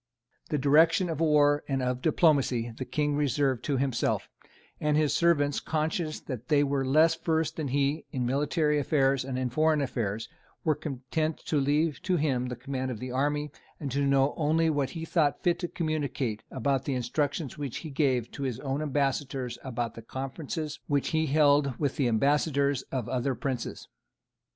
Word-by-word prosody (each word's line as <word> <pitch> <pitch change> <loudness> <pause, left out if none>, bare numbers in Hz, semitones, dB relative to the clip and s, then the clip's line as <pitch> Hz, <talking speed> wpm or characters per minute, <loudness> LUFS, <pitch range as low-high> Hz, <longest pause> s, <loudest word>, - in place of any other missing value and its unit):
The 150 - 0
direction 160 +6 +4
of 155 - -4
war 150 -2 +4
and 135 -2 -1
of 125 0 -1
diplomacy 130 -8 +2
the 130 - -5
King 150 +1 0
reserved 140 -3 +1
to 140 -3 0
himself; 130 -2 0 0.5
and 150 0 +1
his 155 -2 +2
servants, 145 -4 +2
conscious 155 0 -2
that 125 -3 -7
they 145 -1 +4
were 140 -1 0
less 155 +5 +4
versed 160 -1 -1
than 155 -3 -2
he 140 +3 0
in 125 -3 -2
military 150 +3 +1
affairs 135 -3 +2
and 130 -1 -4
in 130 -1 -1
foreign 155 +3 +3
affairs, 110 -6 -2 0.4
were 155 - +3
content 150 +2 -3
to 150 - +1
leave 145 -1 +1
to 185 -2 +1
him 135 -5 0
the 125 - -4
command 130 +1 -4
of 120 -4 -5
the 125 +1 -5
army, 145 +3 0 0.3
and 140 -3 -4
to 140 +3 0
know 140 +1 +3
only 160 +1 +2
what 145 -3 0
he 165 -1 -6
thought 155 -4 +1
fit 175 -1 +2
to 175 - -2
communicate 140 -9 -2
about 135 +1 -1
the 140 - -1
instructions 140 +4 -2
which 140 -5 -4
he 155 - -6
gave 130 -5 +1
to - - -8
his 130 -4 -2
own 140 +1 -2
ambassadors 135 -3 -1
and - - -11
about 120 -2 -3
the 115 - -9
conferences 140 +5 -5
which 145 -2 +1
he 160 0 +1
held 145 -2 +3
with 145 -3 -1
the 135 - +2
ambassadors 140 +3 +2
of 125 -4 -2
other 130 +1 -1
princes. 130 -3 -4
140 Hz, 180 wpm, -28 LUFS, 130-155 Hz, 0.5 s, direction